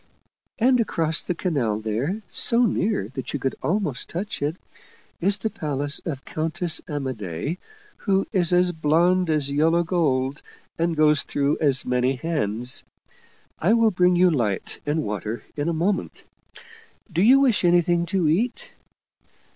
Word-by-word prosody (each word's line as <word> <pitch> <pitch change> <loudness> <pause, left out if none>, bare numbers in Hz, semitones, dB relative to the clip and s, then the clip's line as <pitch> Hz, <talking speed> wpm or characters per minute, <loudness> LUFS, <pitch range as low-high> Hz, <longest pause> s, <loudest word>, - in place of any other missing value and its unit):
And 250 +1 +3
across 165 -7 +1
the 180 - -3
canal 130 - -1
there, 125 - -3
so 235 +1 +3
near 200 - 0
that 130 -1 -6
you 145 - -2
could 135 0 -1
almost 170 -8 -2
touch 190 +1 -4
it, 145 +3 -1 0.6
is 200 +3 +2
the 220 +2 -3
palace 145 -1 -2
of 140 -5 -5
Countess 160 +1 -1
Amadei, 130 - -4 0.4
who 195 -2 0
is 180 -4 +2
as 180 0 +3
blond 170 +3 +2
as 150 -3 +1
yellow 165 +4 +2
gold, 145 -6 0 0.3
and 165 -1 -1
goes 150 -1 +4
through 145 +1 -1
as 140 -3 +3
many 125 +1 +1
hands. 125 -5 0 0.8
I 190 +7 +3
will 230 -1 +4
bring 180 -1 +3
you 180 0 +4
light 110 - -2
and 150 +1 0
water 105 +2 -4
in 150 +2 -1
a - - +1
moment. 180 +5 -2 0.9
Do 170 +1 0
you 255 +7 +6
wish 250 -8 +2
anything 175 0 +3
to 185 -2 0
eat 240 - -1
160 Hz, 145 wpm, -23 LUFS, 140-180 Hz, 0.9 s, you